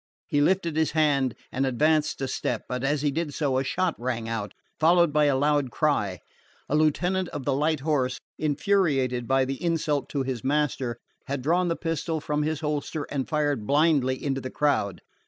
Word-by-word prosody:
He 145 Hz, -, +1 dB
lifted 170 Hz, 0 st, +2 dB
his 160 Hz, 0 st, +1 dB
hand 140 Hz, -5 st, +2 dB, 0.2 s
and 130 Hz, -, -1 dB
advanced 150 Hz, +4 st, +1 dB
a 135 Hz, -, -1 dB
step; -, -, -2 dB
but 125 Hz, 0 st, -3 dB
as 145 Hz, +1 st, 0 dB
he 145 Hz, -, +2 dB
did 155 Hz, 0 st, -3 dB
so 135 Hz, -4 st, +1 dB
a -, -, 0 dB
shot 185 Hz, +5 st, 0 dB
rang 120 Hz, -2 st, -2 dB
out, 115 Hz, -3 st, -3 dB, 0.3 s
followed 170 Hz, -1 st, +4 dB
by 150 Hz, 0 st, +4 dB
a 140 Hz, -2 st, +3 dB
loud 145 Hz, -1 st, +2 dB
cry. 110 Hz, -, 0 dB, 0.5 s
The -, -, -3 dB
lieutenant 175 Hz, +4 st, +1 dB
of 145 Hz, -4 st, -6 dB
the 140 Hz, -, +1 dB
light 150 Hz, +1 st, +1 dB
horse, 135 Hz, -4 st, 0 dB, 0.2 s
infuriated 145 Hz, -, +1 dB
by 135 Hz, 0 st, +3 dB
the 135 Hz, +3 st, -5 dB
insult 155 Hz, -4 st, 0 dB
to 140 Hz, -2 st, -1 dB
his 130 Hz, -3 st, -4 dB
master, 135 Hz, -4 st, 0 dB, 0.3 s
had 140 Hz, -2 st, -3 dB
drawn 175 Hz, +5 st, +2 dB
the 165 Hz, -, 0 dB
pistol 165 Hz, -1 st, -2 dB
from 150 Hz, 0 st, -1 dB
his 155 Hz, 0 st, -1 dB
holster 150 Hz, 0 st, -2 dB
and 135 Hz, -3 st, -2 dB
fired 145 Hz, -8 st, 0 dB
blindly 145 Hz, -3 st, +3 dB
into 135 Hz, -1 st, -1 dB
the 130 Hz, -, -5 dB
crowd. 140 Hz, -11 st, 0 dB
145 Hz, 190 wpm, -26 LUFS, 130-155 Hz, 0.5 s, followed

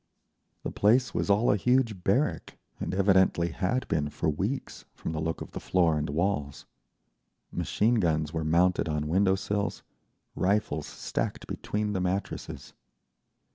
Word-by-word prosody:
The -, -, -3 dB
place 120 Hz, +5 st, +3 dB
was -, -, -1 dB
all 105 Hz, +4 st, +4 dB
a 105 Hz, -, +3 dB
huge 115 Hz, -4 st, +1 dB
barrack, -, -, 0 dB, 0.2 s
and -, -, -3 dB
evidently 95 Hz, -3 st, +3 dB
had 95 Hz, +10 st, -1 dB
been 75 Hz, -2 st, 0 dB
for 75 Hz, -, -1 dB
weeks, 100 Hz, -, -3 dB
from -, -, -5 dB
the 80 Hz, -1 st, -3 dB
look 80 Hz, +1 st, -2 dB
of -, -, -7 dB
the -, -, -5 dB
floor 85 Hz, -4 st, +2 dB
and 75 Hz, -1 st, -2 dB
walls. 75 Hz, -3 st, -1 dB, 0.9 s
Machine 115 Hz, +2 st, +1 dB
guns 80 Hz, -4 st, 0 dB
were 80 Hz, -1 st, -1 dB
mounted 85 Hz, +2 st, +2 dB
on 75 Hz, -1 st, -1 dB
window 95 Hz, +4 st, +3 dB
sills, 100 Hz, +1 st, -2 dB, 0.5 s
rifles 90 Hz, -6 st, 0 dB
stacked -, -, -3 dB
between 105 Hz, 0 st, -3 dB
the 95 Hz, -, -1 dB
mattresses. 95 Hz, +2 st, -3 dB
95 Hz, 145 wpm, -28 LUFS, 80-105 Hz, 0.9 s, all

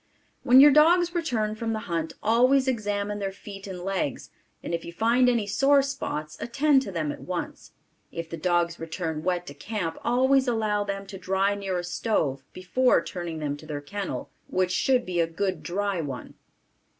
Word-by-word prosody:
When 255 Hz, 0 st, +6 dB
your 290 Hz, +2 st, +9 dB
dogs 340 Hz, +4 st, +5 dB
return 240 Hz, -12 st, -1 dB
from 225 Hz, +1 st, -3 dB
the 215 Hz, -, -3 dB
hunt 165 Hz, -3 st, -2 dB
always 255 Hz, +5 st, +4 dB
examine 205 Hz, -4 st, -1 dB
their 195 Hz, -1 st, -2 dB
feet 195 Hz, 0 st, -10 dB
and 185 Hz, -2 st, -6 dB
legs 185 Hz, -7 st, -3 dB, 0.3 s
and -, -, -4 dB
if 170 Hz, -, -2 dB
you -, -, -7 dB
find 235 Hz, +7 st, +3 dB
any 235 Hz, -4 st, +1 dB
sore 275 Hz, +7 st, +4 dB
spots 155 Hz, -, -4 dB
attend 275 Hz, +3 st, +3 dB
to 205 Hz, -, -6 dB
them 160 Hz, -4 st, -2 dB
at -, -, -9 dB
once. 180 Hz, -1 st, -6 dB, 0.4 s
If 165 Hz, 0 st, -5 dB
the 165 Hz, -, -6 dB
dogs 170 Hz, 0 st, 0 dB
return 160 Hz, -1 st, -4 dB
wet 180 Hz, 0 st, -1 dB
to 140 Hz, -, -8 dB
camp 170 Hz, +1 st, -4 dB
always 260 Hz, +2 st, +3 dB
allow 215 Hz, -3 st, +1 dB
them 200 Hz, -1 st, -4 dB
to 195 Hz, -1 st, -9 dB
dry 190 Hz, +2 st, +1 dB
near 195 Hz, -2 st, -3 dB
a 175 Hz, -, -3 dB
stove 160 Hz, -, -1 dB
before 245 Hz, +8 st, +2 dB
turning 175 Hz, -3 st, -5 dB
them 150 Hz, -2 st, -2 dB
to 155 Hz, -, -13 dB
their 150 Hz, -2 st, -4 dB
kennel 200 Hz, +7 st, -5 dB, 0.2 s
which 185 Hz, 0 st, 0 dB
should 250 Hz, +6 st, +2 dB
be 180 Hz, -1 st, -2 dB
a 165 Hz, -, +3 dB
good 185 Hz, +3 st, -2 dB
dry 195 Hz, 0 st, -1 dB
one. 135 Hz, -5 st, -6 dB
195 Hz, 185 wpm, -26 LUFS, 170-235 Hz, 0.4 s, your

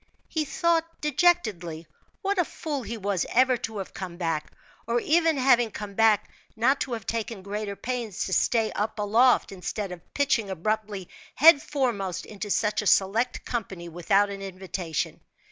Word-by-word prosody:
He 315 Hz, -2 st, -1 dB
thought, 330 Hz, +1 st, 0 dB
dejectedly, 220 Hz, -, +1 dB, 0.4 s
what 395 Hz, 0 st, 0 dB
a -, -, +5 dB
fool 300 Hz, -3 st, -4 dB
he 230 Hz, 0 st, -5 dB
was 200 Hz, -4 st, -1 dB
ever 255 Hz, +1 st, +4 dB
to 225 Hz, -2 st, -5 dB
have 195 Hz, -, -6 dB
come 180 Hz, -3 st, -6 dB
back; 165 Hz, -3 st, -2 dB, 0.4 s
or 235 Hz, +1 st, +2 dB
even 325 Hz, +2 st, +3 dB
having 245 Hz, -3 st, +4 dB
come 205 Hz, -1 st, -7 dB
back, 215 Hz, -1 st, +3 dB, 0.2 s
not 260 Hz, +5 st, +2 dB
to 255 Hz, -, -2 dB
have 225 Hz, -3 st, -5 dB
taken 225 Hz, -3 st, -3 dB
greater 205 Hz, 0 st, -4 dB
pains 235 Hz, -4 st, -3 dB
to 190 Hz, -, -3 dB
stay 225 Hz, +2 st, +2 dB
up 215 Hz, +2 st, -2 dB
aloft, 225 Hz, +4 st, +3 dB
instead 195 Hz, +1 st, -4 dB
of 175 Hz, -2 st, -11 dB
pitching 265 Hz, -7 st, +1 dB
abruptly 200 Hz, +1 st, -2 dB, 0.3 s
head 310 Hz, 0 st, +8 dB
foremost 235 Hz, -, -2 dB
into 210 Hz, 0 st, -7 dB
such 210 Hz, +1 st, +1 dB
a 210 Hz, -, -3 dB
select 220 Hz, +7 st, +2 dB
company 190 Hz, -7 st, -4 dB
without 195 Hz, +4 st, +2 dB
an 195 Hz, 0 st, -6 dB
invitation. 185 Hz, -4 st, -4 dB
215 Hz, 160 wpm, -26 LUFS, 195-255 Hz, 0.4 s, head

